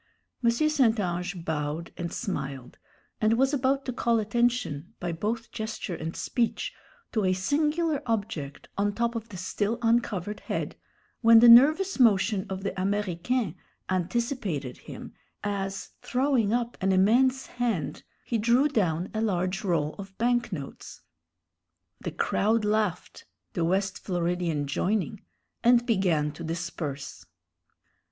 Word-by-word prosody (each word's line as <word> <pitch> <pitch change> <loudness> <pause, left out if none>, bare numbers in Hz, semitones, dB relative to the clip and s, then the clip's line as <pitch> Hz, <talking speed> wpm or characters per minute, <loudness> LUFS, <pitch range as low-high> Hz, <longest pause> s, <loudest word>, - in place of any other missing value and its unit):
M. 235 - +5
St. 240 -3 +3
Ange 175 -1 -3
bowed 155 +1 -3
and 170 -1 -4
smiled, 135 - -5 0.4
and 220 +1 +3
was 270 +3 +3
about 275 0 +1
to 255 - -3
call 235 -1 +2
attention, 225 -8 0
by 175 -1 -2
both 220 +7 -3
gesture 220 -4 -4
and 165 0 -5
speech, 235 -2 -1 0.4
to 215 - 0
a 185 -1 +3
singular 300 - +1
object 200 -11 -3
on 205 0 +1
top 235 0 0
of 230 -1 -5
the 195 - -8
still 205 +5 -1
uncovered 215 -4 +1
head, - - -3 0.5
when 230 -1 +8
the 240 - +7
nervous 305 +10 +7
motion 205 -3 +4
of 190 0 -4
the 200 - -1
Américain 200 +2 -1 0.4
anticipated 185 - -2
him, - - -10 0.3
as, 195 -1 -3
throwing 255 -5 +1
up 240 0 -1
an 190 +1 +2
immense 245 +8 +4
hand, 230 - -2 0.2
he 230 - -1
drew 240 +6 +4
down 180 - 0
a 220 - -1
large 190 -2 0
roll 160 -6 0
of 195 -1 -9
bank 240 0 +1
notes. 145 -7 -7 1.0
The - - -4
crowd 220 +1 +1
laughed, 210 -4 -1 0.3
the 170 - 0
West 190 +3 0
Floridian 175 -4 -1
joining, 195 +7 -1 0.4
and 240 0 +5
began 180 - +2
to 155 +3 -9
disperse. 160 -4 -5
205 Hz, 135 wpm, -27 LUFS, 175-235 Hz, 1.0 s, when